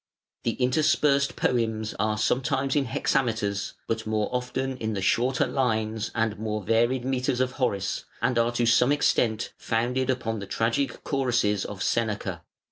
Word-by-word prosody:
The 115 - +1
interspersed 140 +2 +2
poems 110 -3 0
are 105 0 +1
sometimes 135 +5 0
in 145 -2 +2
hexameters, 110 -5 -1
but 110 -1 -2
more 110 -1 0
often 130 +1 -2
in 110 -2 -2
the 95 - -2
shorter 125 +5 +2
lines 110 -4 -1
and 110 -2 0
more 105 -1 -3
varied 120 +5 +2
metres 130 -1 0
of 130 0 +1
Horace, 100 -9 -1
and 125 -2 +1
are 115 +1 +2
to 120 0 +1
some 125 +3 +4
extent 115 -6 +1
founded 125 +3 0
upon 115 -4 -1
the 100 - -7
tragic 115 +5 -1
choruses 120 -8 +1
of 100 -2 -5
Seneca. 105 -6 -1
115 Hz, 150 wpm, -26 LUFS, 110-130 Hz, -, some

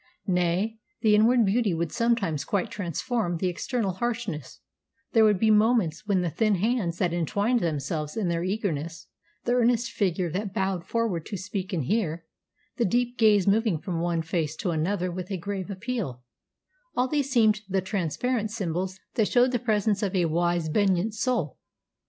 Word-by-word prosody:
Nay, 185 +4 0 0.2
the 215 -2 +4
inward 225 +2 +5
beauty 200 -2 +1
would 165 -1 -2
sometimes 230 - 0
quite 205 +2 -1
transform 185 - -2
the 185 - -2
external 195 +4 -1
harshness; 200 - -4 0.5
there 225 -2 +5
would 210 -2 +5
be 220 +3 +3
moments 210 -5 +2
when 195 -3 +2
the 175 - 0
thin 210 +6 +2
hands 195 -3 0
that 180 -3 0
entwined 200 +8 +1
themselves 150 - -2
in 210 -5 0
their 170 0 0
eagerness, 180 -5 -3 0.4
the 245 - -1
earnest 240 -1 +2
figure 180 -4 0
that 195 +2 -3
bowed 190 -3 -1
forward 225 -8 -1
to 205 - -4
speak 190 0 -4
and 170 -6 -1
hear, 170 - -1 0.5
the 240 - +2
deep 245 +4 +1
gaze 210 -4 +5
moving 210 -3 +2
from 170 +1 -4
one 170 -1 0
face 160 -2 -2
to 175 - -2
another 180 +3 -1
with 180 0 -6
a 195 - -2
grave 195 +1 -4
appeal, 200 - -4 0.7
all 250 - +3
these 285 0 0
seemed 220 -5 +3
the 190 0 +1
transparent 205 - -1
symbols 190 -3 -3
that 220 -3 +2
showed 250 +1 +4
the 245 - 0
presence 215 -3 +1
of 200 -2 -1
a 180 -2 +3
wise 170 0 +1
benignant 195 +4 +1
soul. 220 - -1
195 Hz, 170 wpm, -26 LUFS, 170-225 Hz, 0.7 s, inward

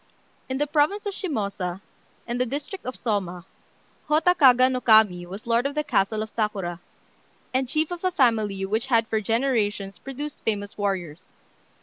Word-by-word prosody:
] - - -36
In 260 - -1
the 295 - +1
province 300 +8 +1
of 405 - -2
Shimôsa, 200 - -3 0.5
and 240 +1 -2
the - - +2
district 290 - -5
of 255 - -4
Sôma, 185 -6 -2 0.6
Hotta 315 +4 +4
Kaga 255 -6 +6
no 255 -1 -1
Kami 210 -7 +5
was 195 +4 -9
lord 235 +3 +2
of 285 - -7
the 300 - 0
castle 215 -3 +1
of 220 - -9
Sakura, 195 -6 -2 0.7
and 260 -1 0
chief 310 +4 0
of 350 0 -5
a 370 - +3
family 220 - +1
which 220 +6 -1
had 230 -3 +3
for 220 -1 0
generations 210 -5 0
produced 280 +5 -6
famous 205 -2 -2
warriors. 185 -5 -3
230 Hz, 170 wpm, -25 LUFS, 200-275 Hz, 0.7 s, Kaga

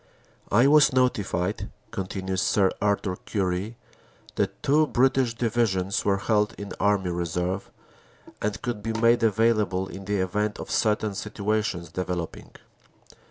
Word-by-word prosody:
"I 115 +5 +5
was 150 0 +6
notified," 105 -7 0 0.2
continues 95 -1 -3
Sir 95 -2 +3
Arthur 100 -2 0
Currie, 100 +3 -2 0.6
"that - - -2
two 150 +2 +4
British 130 -2 +2
Divisions 105 -5 0
were 100 -1 +2
held 105 +1 +1
in 100 0 -7
Army 100 -3 +2
Reserve, 90 +2 -2 0.7
and 105 +1 -2
could 120 -4 -3
be 115 +2 -3
made 115 +1 +3
available 105 -4 +2
in 95 0 -9
the 105 +1 0
event 105 +3 -1
of - - -7
certain 105 -1 +1
situations 105 -3 -2
developing. 90 -1 -4
105 Hz, 125 wpm, -26 LUFS, 95-115 Hz, 0.7 s, was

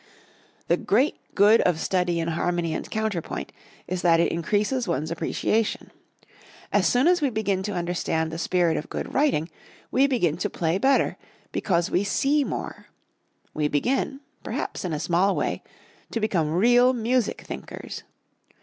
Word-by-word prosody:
The - - +3
great 255 +9 +1 0.2
good 210 +3 +6
of 165 -3 +1
study 180 -1 0
in 165 0 -1
harmony 170 0 -1
and - - -5
counterpoint 220 -6 -3 0.3
is 180 0 -3
that 170 -2 +4
it 170 - +2
increases 210 - 0
one's 155 +5 -1
appreciation. 210 +6 -1 0.8
As - - +4
soon 250 +5 +3
as 355 -1 +4
we 285 - +2
begin 205 -4 -1
to 205 +2 -3
understand 170 -2 -1
the 165 - -5
spirit 175 -2 +1
of 150 - -5
good - - -5
writing 265 - +2 0.4
we 270 +2 +4
begin 180 - +1
to 210 - -2
play 170 +1 -1
better, 270 +5 +2 0.3
because 170 -3 0
we 185 - +2
see 280 +8 +2
more. - - -5 0.7
We 150 -1 0
begin, 265 - -1 0.2
perhaps - - -4
in 180 - -3
a 150 - -2
small 180 +5 +2
way, - - -1 0.5
to 230 - -2
become 185 -8 0
real 245 +8 +5
music 240 -1 0
thinkers. - - -8
190 Hz, 155 wpm, -25 LUFS, 170-240 Hz, 0.8 s, good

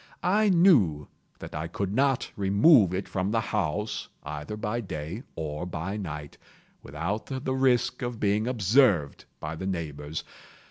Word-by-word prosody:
I 205 +4 +3
knew 130 - +4 0.3
that - - -9
I 80 +2 -3
could 95 +3 -3
not 135 +1 +1
remove 100 - +5
it 95 +1 -3
from 95 +1 -1
the 115 +1 +1
house, 105 -1 -2
either 75 +7 -6
by 110 +2 -2
day 85 +1 -5
or 80 +2 -4
by 90 +3 -4
night, 75 -7 -6 0.4
without 85 +10 -4
the 130 -1 -3
risk 130 -2 +2
of 120 -2 -4
being 105 +2 +1
observed 105 - +3
by 75 +2 -5
the 95 +4 -5
neighbors. 75 -4 -4
100 Hz, 145 wpm, -27 LUFS, 80-120 Hz, 0.4 s, remove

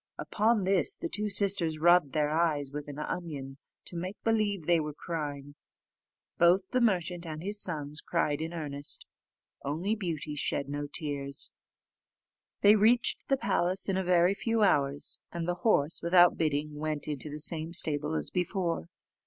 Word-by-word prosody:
Upon 220 -1 +1
this, 195 - +3
the 340 - -4
two 210 -5 0
sisters 190 -6 +3
rubbed 175 -3 +4
their 150 -1 +1
eyes 155 -4 0
with 145 0 -6
an 145 -1 -8
onion, 150 -4 -5 0.3
to - - -4
make 185 +4 -5
believe 210 -6 0
they 170 0 +3
were 150 -1 -4
crying; 145 -4 -5 0.9
both 180 +3 +4
the 255 - +1
merchant 180 -6 +1
and 160 -1 -6
his 205 +2 0
sons 150 -3 -3
cried 145 0 -1
in 160 +1 -3
earnest. 145 -4 -4 0.6
Only 165 +9 -1
Beauty 165 -8 -4
shed 140 -1 -2
no 145 0 -3
tears. 140 -3 -2 1.1
They 205 +1 +7
reached 230 +4 +2
the 270 - +3
palace 185 -4 0
in 195 - 0
a 190 - 0
very 180 +1 +3
few 225 +2 0
hours, 140 -6 +1
and 170 -1 -4
the 175 - +1
horse, 165 -8 +2
without 175 +1 +5
bidding, 150 -1 -1
went 155 -1 -2
into 150 0 -4
the 150 - -6
same 160 +1 -1
stable 155 -2 +1
as - - 0
before. 175 - -2
165 Hz, 160 wpm, -29 LUFS, 150-190 Hz, 1.1 s, They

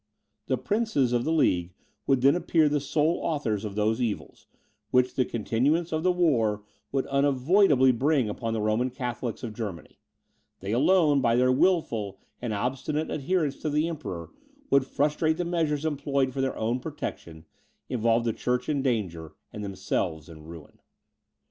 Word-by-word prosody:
The 130 - +1
princes 145 - 0
of 120 0 +1
the 160 - 0
League 90 - +1 0.3
would 135 -2 +3
then 140 +3 +5
appear 165 -3 +2
the 145 0 +1
sole 150 +4 0
authors 115 -10 -1
of 105 -2 -5
those 110 +3 +1
evils, 115 -4 -4 0.4
which 125 0 +2
the 130 - +1
continuance 135 +10 0
of 155 0 0
the 185 +2 +3
war 120 -13 +1 0.3
would 135 -1 0
unavoidably 140 +1 +4
bring 135 0 +1
upon 115 +2 -3
the 110 - -1
Roman 110 +4 +1
Catholics 120 -2 -5
of 115 -3 -5
Germany; 105 -7 -7 0.6
they 100 +2 -5
alone, 150 - +4
by 115 -2 +3
their 125 +1 +4
wilful 120 - +1 0.2
and 120 -2 -3
obstinate 130 +8 -2
adherence 155 -1 -1
to 155 - -3
the 150 +2 +1
Emperor, 90 - -6 0.4
would 140 -1 +4
frustrate 150 +3 +1
the 175 - -1
measures 160 -3 -1
employed 140 -3 0
for 135 - -2
their 135 0 0 0.3
protection, 80 -8 -7 0.4
involve 115 -1 +1
the 115 - +1
church 125 +2 -1
in 145 -3 0
danger, 95 - -2 0.2
and 105 - -6
themselves 95 -5 -3
in 80 -2 -12
ruin. 80 -2 -12
130 Hz, 160 wpm, -27 LUFS, 110-150 Hz, 0.6 s, then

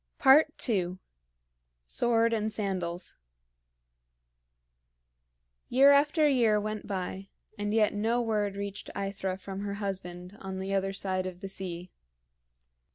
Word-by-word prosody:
II. 245 - +4 0.9
SWORD 230 - +2
AND 220 -1 0
SANDALS. 185 -4 -3 2.5
Year 275 +3 +7
after 295 +2 +4
year 235 -6 +3
went 215 0 -4
by, 190 0 -4 0.3
and 205 0 -2
yet 215 -1 +3
no 225 +4 +1
word 210 -4 0
reached 200 0 -5
AEthra 195 -1 -3
from 195 0 -7
her 200 0 -3
husband 185 -2 -5
on 190 -1 -6
the 190 +1 -3
other 195 0 +1
side 185 -1 -1
of 180 0 -8
the 195 - -5
sea. 180 -2 -6
200 Hz, 115 wpm, -29 LUFS, 190-225 Hz, 2.5 s, Year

